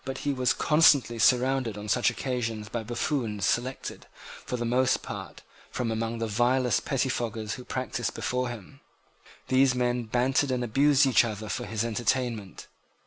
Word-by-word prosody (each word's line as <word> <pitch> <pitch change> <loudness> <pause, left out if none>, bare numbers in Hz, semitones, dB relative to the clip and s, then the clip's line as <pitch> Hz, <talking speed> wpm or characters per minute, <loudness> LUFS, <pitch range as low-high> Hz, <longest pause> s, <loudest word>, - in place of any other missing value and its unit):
He 145 +1 -1
was 130 -1 +1
constantly 145 -6 +4
surrounded 125 -2 +2
on 105 +1 -7
such 120 +3 +3
occasions 115 -5 -3
by 115 0 -3
buffoons 115 - -2
selected, 130 +2 -2 0.4
for 125 - -4
the 120 - -3
most 125 +2 +1
part, - - -8 0.3
from 120 -2 -2
among 115 +1 -2
the 115 - -2
vilest 120 +1 +1
pettifoggers 120 -5 -2
who 125 - -8
practiced 125 -3 -3
before 125 0 -1
him. 115 -6 -10 0.7
These 130 0 +4
men 125 -1 0
bantered 130 +5 +1
and 125 -1 -1
abused 140 +4 +4
each 130 -3 +5
other 110 -2 -5
for - - -3
his 115 0 -2
entertainment. 115 -3 -2
120 Hz, 150 wpm, -27 LUFS, 115-130 Hz, 0.7 s, each